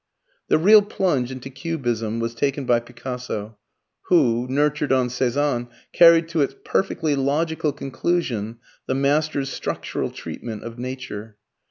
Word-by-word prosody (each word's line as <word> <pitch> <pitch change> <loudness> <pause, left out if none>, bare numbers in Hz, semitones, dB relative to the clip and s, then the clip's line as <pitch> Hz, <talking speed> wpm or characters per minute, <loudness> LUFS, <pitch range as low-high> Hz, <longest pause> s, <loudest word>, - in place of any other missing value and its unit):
The - - +4
real 210 +6 +7
plunge 180 - 0
into 130 +1 -7
Cubism 120 -6 -2
was 115 0 -2
taken 140 +3 -1
by 120 -1 +3
Picasso, 120 -3 -6 0.5
who, 125 -8 +3
nurtured 145 +1 +1
on 130 -2 +2
Cezanne, 125 0 0 0.3
carried 165 -1 +7
to 165 -2 0
its 140 - 0
perfectly 155 -5 0
logical 150 +3 0
conclusion 130 -5 -2 0.3
the 130 - 0
master's 140 0 +1
structural - - -3
treatment 110 -3 -7
of 115 +1 -8
nature. 120 -4 -6
135 Hz, 130 wpm, -23 LUFS, 120-150 Hz, 0.5 s, real